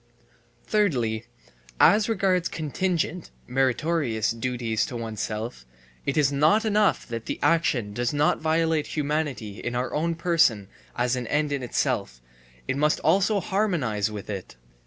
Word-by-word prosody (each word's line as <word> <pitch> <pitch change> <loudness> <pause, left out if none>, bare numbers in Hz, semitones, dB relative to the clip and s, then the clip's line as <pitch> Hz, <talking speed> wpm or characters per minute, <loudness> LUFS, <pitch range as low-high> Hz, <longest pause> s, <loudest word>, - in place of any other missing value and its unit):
Thirdly, 120 - +1 0.5
as 210 +1 +5
regards 185 -5 +1
contingent 170 +2 -2 0.2
(meritorious) 130 -2 0
duties 115 -1 -1
to 125 - -7
oneself: 110 - -4 0.4
It 140 - 0
is 145 -2 +3
not 155 +11 +3
enough 210 -1 +2
that 115 -1 -6
the - - -2
action 130 -11 +2
does 120 +2 -1
not 145 +1 +1
violate 160 -1 +1
humanity 145 -8 -2
in 120 0 -4
our 125 +1 -2
own 165 +2 0
person 160 - +2 0.3
as 125 +1 +1
an 125 -2 -4
end 150 +2 0
in 140 -2 -1
itself, 60 - -1 0.5
it 135 - -1
must 150 +1 +2
also 200 +6 +3
harmonize 170 - 0
with 105 -2 -7
it. 100 - -6
145 Hz, 135 wpm, -25 LUFS, 115-165 Hz, 0.5 s, as